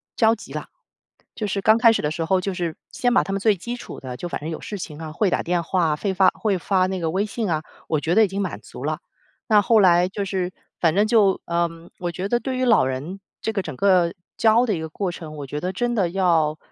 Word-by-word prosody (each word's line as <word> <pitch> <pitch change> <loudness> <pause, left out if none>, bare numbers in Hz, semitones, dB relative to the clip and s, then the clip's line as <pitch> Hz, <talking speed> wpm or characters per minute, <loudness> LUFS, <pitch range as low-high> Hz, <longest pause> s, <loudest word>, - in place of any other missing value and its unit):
着 225 -1 +4
急 225 - -9
了。 - - -5 0.7
就 215 - -3
是 200 0 -1
刚 220 +2 +5
开 230 -1 +7
始 225 - -1
的 150 - 0
时 165 +1 -2
候， 185 +3 +2
就 190 +1 -3
是 170 -3 -3 0.2
先 245 - 0
把 245 - +4
他 195 - -4
们 195 - -1
最 210 +1 +3
基 235 +7 -5
础 245 - -9
的， 130 -2 -7
就 175 - -5
反 - - -3
正 155 +3 -5
有 160 - -6
事 205 - -5
情 155 -5 -7
啊 160 -1 -6
会 190 +4 +1
打 - - +1
电 175 0 0
话 165 -3 +1
会 195 +5 -2
发 190 0 +5
会 200 -4 0
发 185 +1 +2
那 190 0 -2
个 165 -2 -1
微 190 +5 0
信 215 -1 -3
啊， 155 -2 0 0.2
我 155 - +1
觉 165 +3 0
得 220 - +6
已 - - +3
经 195 +1 -4
满 195 - -3
足 - - -10
了。 - - -2 0.5
那 215 -3 +6
后 225 +2 +4
来 180 -2 +5
就 195 +2 -4
是， 185 -2 -2 0.3
反 165 -2 +3
正 205 +4 +3
就， 210 -4 +3
呃， 170 0 +1 0.3
我 175 -1 -2
觉 185 +4 -4
得 240 - +2
对 260 +1 -3
于 255 - +1
老 230 - +5
人， 140 +9 -4 0.2
这 220 - -1
个 205 -3 -1
整 155 -6 -7
个 180 +1 +3 0.2
教 225 +2 +4
的 220 - 0
一 - - -4
个 160 - -4
过 185 +3 -3
程， 160 -3 -8
我 145 - -5
觉 145 +3 -4
得 180 +4 -2
真 240 +4 -1
的 190 -6 +1
要， 165 -5 +2
185 Hz, 290 characters per minute, -23 LUFS, 165-210 Hz, 0.7 s, 开